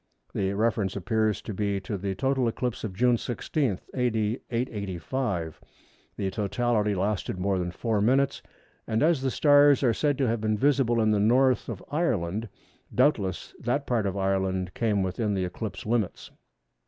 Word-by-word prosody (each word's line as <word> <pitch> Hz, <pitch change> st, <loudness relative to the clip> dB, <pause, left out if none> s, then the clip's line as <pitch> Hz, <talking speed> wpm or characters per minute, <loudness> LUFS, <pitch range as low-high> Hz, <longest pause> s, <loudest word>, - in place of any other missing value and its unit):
The 95 Hz, 0 st, 0 dB
reference 105 Hz, -2 st, 0 dB
appears 110 Hz, +2 st, 0 dB
to 110 Hz, -, -5 dB
be 100 Hz, 0 st, -1 dB
to 100 Hz, -, -4 dB
the 95 Hz, 0 st, -3 dB
total 130 Hz, +3 st, +1 dB
eclipse 120 Hz, +1 st, -2 dB
of 100 Hz, -5 st, -4 dB
June 125 Hz, +2 st, +3 dB
16, 120 Hz, -, -2 dB
A.D. 115 Hz, -2 st, 0 dB
885. 105 Hz, -5 st, -3 dB, 0.6 s
The 95 Hz, -1 st, -1 dB
totality 105 Hz, +1 st, 0 dB
lasted 95 Hz, 0 st, -1 dB
more 95 Hz, +1 st, 0 dB
than 90 Hz, -1 st, -2 dB
four 105 Hz, +3 st, -1 dB
minutes, 135 Hz, +5 st, +2 dB, 0.5 s
and 110 Hz, +2 st, +1 dB
as 160 Hz, -3 st, +3 dB
the 135 Hz, -, 0 dB
stars 145 Hz, 0 st, +5 dB
are 120 Hz, -3 st, +4 dB
said 145 Hz, +1 st, 0 dB
to 135 Hz, -3 st, +1 dB
have 115 Hz, -1 st, 0 dB
been 110 Hz, -1 st, +1 dB
visible 130 Hz, -2 st, +2 dB
in 110 Hz, -1 st, +3 dB
the 105 Hz, -, +2 dB
North 125 Hz, +5 st, +3 dB
of 105 Hz, -5 st, -6 dB
Ireland, 110 Hz, -, -1 dB, 0.5 s
doubtless 100 Hz, -, +1 dB
that 140 Hz, +4 st, -1 dB
part 115 Hz, -5 st, 0 dB
of 95 Hz, 0 st, -3 dB
Ireland 95 Hz, -1 st, 0 dB
came 105 Hz, -4 st, +1 dB
within 100 Hz, +3 st, -1 dB
the 95 Hz, -1 st, 0 dB
eclipse 100 Hz, +2 st, -6 dB
limits. 110 Hz, -3 st, -1 dB
110 Hz, 165 wpm, -27 LUFS, 95-125 Hz, 0.6 s, stars